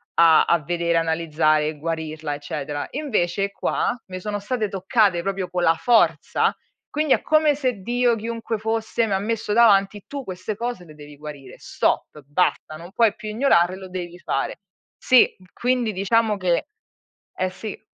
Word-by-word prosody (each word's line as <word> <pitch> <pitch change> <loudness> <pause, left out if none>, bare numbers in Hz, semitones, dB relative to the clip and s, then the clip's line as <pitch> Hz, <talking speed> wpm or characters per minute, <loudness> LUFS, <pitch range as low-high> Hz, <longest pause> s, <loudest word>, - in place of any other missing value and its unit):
a 165 -1 +6
a 170 -2 +2
vedere, 170 +2 0
analizzare 160 -2 +1
e 155 -1 -4
guarirla 160 -1 -4
eccetera. 145 0 -4
Invece 200 - -1
qua, 240 - -1
mi 185 0 -6
sono 205 +2 -3
state 215 +1 -2
toccate 195 -1 +1
proprio 195 -1 -2
con 180 -1 -1
la 165 0 +4
forza, 170 -9 +2 0.4
quindi 300 -2 +2
è - - +1
come 310 -2 +3
se 255 -5 -1
Dio 240 +3 +1
chiunque 230 0 -4
fosse 225 +1 -1
mi 200 - -1
ha 190 - +1
messo 220 0 -2
davanti: 205 -3 +4
"Tu 280 -2 -6
queste 190 +3 -5
cose 235 -6 -4
le 155 -3 -14
devi 145 -1 -12
guarire. 145 -3 -10
Stop! 150 - -1
Basta! 155 0 0
Non 170 +3 -11
puoi 225 -1 +3
più 215 -2 -7
ignorare, 190 -7 +2
lo 190 -1 -9
devi 175 -1 -7
fare." 135 -1 -2 0.4
Sì. 255 -1 +5 0.2
Quindi 245 -3 0
diciamo 210 +3 +2
che 180 -3 0 0.7
eh, 185 0 -1
sì. 210 +2 -7
190 Hz, 165 wpm, -23 LUFS, 165-225 Hz, 0.7 s, a